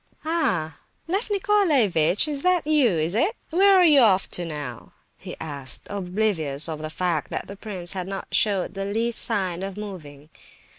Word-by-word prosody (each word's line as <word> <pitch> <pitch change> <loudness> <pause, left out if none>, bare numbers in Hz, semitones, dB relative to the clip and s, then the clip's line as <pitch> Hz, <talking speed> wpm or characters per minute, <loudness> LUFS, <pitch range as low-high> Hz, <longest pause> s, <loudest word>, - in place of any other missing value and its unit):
"Ah! 180 - -1 0.3
Lef 390 +7 -1
Nicolaievitch, 290 - +2
it's 325 +4 +1
you, 300 -4 +4
is 165 -2 0
it? 335 - +1 0.2
Where 390 +4 +5
are 365 -1 +6
you 300 -4 +6
off 195 -6 +4
to 175 - -1
now?" 145 -7 -7 0.2
he - - -9
asked, 140 -4 -4
oblivious 180 -7 0
of 155 -2 -5
the 155 - -4
fact 170 -2 -2
that - - -4
the 200 - -9
prince 190 -4 -5
had 185 -2 -4
not 195 0 -6
showed 200 -4 +1
the 195 0 -4
least 225 +3 -1
sign 190 -6 -1
of 195 0 -6
moving. 155 -8 -9
195 Hz, 165 wpm, -24 LUFS, -, 0.3 s, are